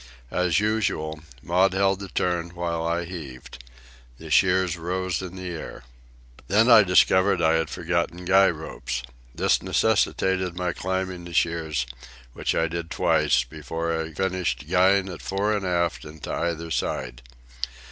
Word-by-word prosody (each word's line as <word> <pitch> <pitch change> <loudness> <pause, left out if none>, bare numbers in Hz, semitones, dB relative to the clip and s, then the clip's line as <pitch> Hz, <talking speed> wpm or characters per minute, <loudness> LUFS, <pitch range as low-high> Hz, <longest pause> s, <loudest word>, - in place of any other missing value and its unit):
As 90 -2 +2
usual, 100 -8 -1 0.2
Maud 90 +2 +3
held 95 0 +2
the 100 - -6
turn 90 -1 -2
while 85 -1 -2
I 85 +1 -1
heaved. 70 -8 -9 0.5
The - - -10
shears 95 -2 +3
rose 90 +1 -2
in 95 -1 -7
the 95 -1 -6
air. 85 -6 -7 0.6
Then 110 +5 +4
I 115 -2 +10
discovered 95 0 +4
I 80 -1 +3
had 80 -1 0
forgotten 85 +1 -2
guy 95 +1 +5
ropes. 75 -5 -5 0.3
This - - +2
necessitated 95 -2 +1
my 90 -1 -1
climbing 95 -1 -3
the 85 -1 -8
shears, 80 -6 0 0.5
which - - -1
I 80 - +2
did 85 +1 -5
twice, - - +2
before 80 +5 -4
I 80 0 -3
finished 90 -3 -2
guying 95 +2 +3
it 90 -4 -7
fore 100 +2 0
and 100 -2 -2
aft 85 -2 0
and 75 +1 -11
to - - -4
either 85 -1 -2
side. - - -2
85 Hz, 150 wpm, -25 LUFS, 80-95 Hz, 0.6 s, I